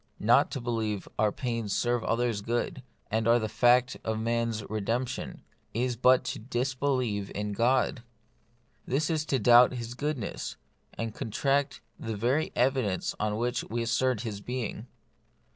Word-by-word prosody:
Not -, -, +4 dB
to -, -, -4 dB
believe 110 Hz, -4 st, -2 dB
our 110 Hz, -1 st, +3 dB
pains 115 Hz, -5 st, -2 dB
serve 120 Hz, -1 st, +1 dB
others' 115 Hz, -2 st, 0 dB
good, 120 Hz, +4 st, -2 dB, 0.3 s
and 110 Hz, +1 st, +1 dB
are 120 Hz, +1 st, +6 dB
the 110 Hz, -2 st, -1 dB
fact 125 Hz, +3 st, +3 dB
of 110 Hz, 0 st, -1 dB
man's 115 Hz, -1 st, -1 dB
re 110 Hz, 0 st, -3 dB
demption, 120 Hz, +5 st, -3 dB, 0.3 s
is 125 Hz, +1 st, 0 dB
but 125 Hz, +2 st, +5 dB
to 125 Hz, -, -4 dB
disbelieve 125 Hz, -3 st, -1 dB
in 105 Hz, 0 st, -2 dB
God. 125 Hz, +3 st, +2 dB, 0.9 s
It 150 Hz, +5 st, 0 dB
is 155 Hz, -1 st, 0 dB
to 135 Hz, -, +2 dB
doubt 120 Hz, +2 st, +6 dB
His 120 Hz, -1 st, -5 dB
goodness, 140 Hz, -4 st, -3 dB, 0.4 s
and 115 Hz, -1 st, -4 dB
contradict 135 Hz, +6 st, 0 dB, 0.2 s
the 110 Hz, -2 st, -4 dB
very 125 Hz, +9 st, +1 dB
evidence 125 Hz, -7 st, +1 dB
on 105 Hz, 0 st, 0 dB
which 120 Hz, +1 st, -1 dB
we 115 Hz, +1 st, -2 dB
assert 120 Hz, 0 st, +1 dB
His 105 Hz, -4 st, -5 dB
being. 120 Hz, -1 st, -4 dB
120 Hz, 150 wpm, -29 LUFS, 110-125 Hz, 0.9 s, are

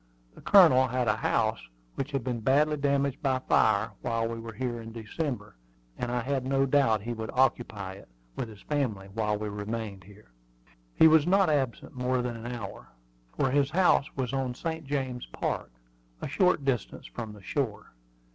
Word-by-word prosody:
The -, -, -15 dB
Colonel 160 Hz, -10 st, +7 dB
had 125 Hz, 0 st, -1 dB
a 110 Hz, -, +2 dB
house -, -, +1 dB, 0.3 s
which 135 Hz, +1 st, -3 dB
had 135 Hz, -4 st, -2 dB
been 125 Hz, -2 st, -2 dB
badly 145 Hz, +6 st, +3 dB
damaged 140 Hz, -1 st, 0 dB
by 135 Hz, -2 st, +2 dB
fire 130 Hz, -, +2 dB
while 115 Hz, 0 st, 0 dB
we 115 Hz, 0 st, -5 dB
were 115 Hz, 0 st, -7 dB
here 120 Hz, +1 st, -3 dB
in 115 Hz, 0 st, -9 dB
December, 115 Hz, -, -4 dB, 0.4 s
and 120 Hz, -, -3 dB
I 120 Hz, 0 st, 0 dB
had 135 Hz, +1 st, -1 dB
no 135 Hz, +1 st, +2 dB
doubt 130 Hz, -7 st, +3 dB
he 120 Hz, +2 st, -3 dB
would 110 Hz, -1 st, -5 dB
occupy 110 Hz, -7 st, +1 dB
it, 95 Hz, -, -13 dB, 0.3 s
with 115 Hz, -, -4 dB
his 105 Hz, -2 st, -13 dB
family, 115 Hz, -10 st, -2 dB
while 105 Hz, -1 st, 0 dB
we 105 Hz, 0 st, -4 dB
remained 105 Hz, -1 st, -5 dB
here. 105 Hz, -5 st, -17 dB, 0.6 s
He 160 Hz, -, +8 dB
was 160 Hz, 0 st, +5 dB
not 190 Hz, -2 st, +4 dB
absent 135 Hz, -5 st, -1 dB
more 125 Hz, 0 st, 0 dB
than 120 Hz, -1 st, -3 dB
an 115 Hz, +1 st, -6 dB
hour, 110 Hz, -5 st, -7 dB, 0.5 s
for 135 Hz, -, +2 dB
his 140 Hz, 0 st, +3 dB
house 170 Hz, -3 st, +3 dB
was 130 Hz, -1 st, -2 dB
on 130 Hz, -2 st, -1 dB
St. 160 Hz, 0 st, -4 dB
James 130 Hz, -3 st, -3 dB
Park, -, -, -3 dB, 0.5 s
a -, -, -4 dB
short 180 Hz, -1 st, +2 dB
distance 125 Hz, -6 st, -2 dB
from 110 Hz, -3 st, -7 dB
the 105 Hz, -2 st, -14 dB
shore. 125 Hz, -1 st, -3 dB
125 Hz, 185 wpm, -28 LUFS, 110-140 Hz, 0.6 s, He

